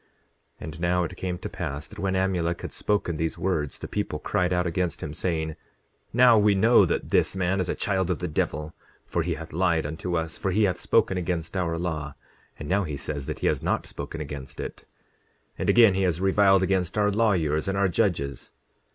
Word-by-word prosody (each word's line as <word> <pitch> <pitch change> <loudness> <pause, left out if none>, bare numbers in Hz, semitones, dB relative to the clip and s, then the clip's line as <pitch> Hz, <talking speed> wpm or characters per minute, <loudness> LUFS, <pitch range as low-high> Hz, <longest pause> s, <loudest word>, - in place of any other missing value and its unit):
10:28 - - -27
And 80 0 -8
now 90 +1 +1
it 85 +1 -5
came 90 -1 -3
to - - -6
pass 70 +3 -5
that - - -12
when 95 -1 0
Amulek 90 -3 0
had - - -6
spoken 100 -6 -1
these 80 +1 -2
words 80 -6 -1
the - - -7
people 105 -7 -2
cried 90 +3 0
out 90 0 +1
against 90 0 -2
him, 75 - -5
saying: 80 -2 -2 0.6
Now 120 -1 +6
we 105 -1 +4
know 115 +5 +5
that - - -2
this - - +2
man 95 +1 0
is 90 -1 -1
a - - 0
child 95 -3 0
of 90 - 0
the 90 - -3
devil, 75 0 -2 0.3
for 85 - -1
he 85 0 -1
hath 80 0 -9
lied 85 -2 +1
unto 80 +4 -2
us; 80 0 -3
for 95 - -1
he 105 +4 +2
hath 90 -3 +1
spoken 95 - +2
against 85 0 -3
our 85 -3 0
law. 75 -5 -3 0.4
And 75 - -7
now 100 +4 +2
he 75 -5 -4
says 70 -1 -4
that - - -5
he - - -1
has - - +1
not - - 0
spoken 70 +3 -6
against 70 -3 -7
it. - - -5
10:29 - - -18 0.8
And - - -1
again, 115 -5 +7
he 95 - 0
has 90 -3 +1
reviled 95 0 +4
against 95 0 0
our 105 0 +3
lawyers, 90 -8 +1
and 95 0 0
our 100 0 +3
judges. 85 -8 -1
90 Hz, 220 wpm, -26 LUFS, 80-95 Hz, 0.8 s, again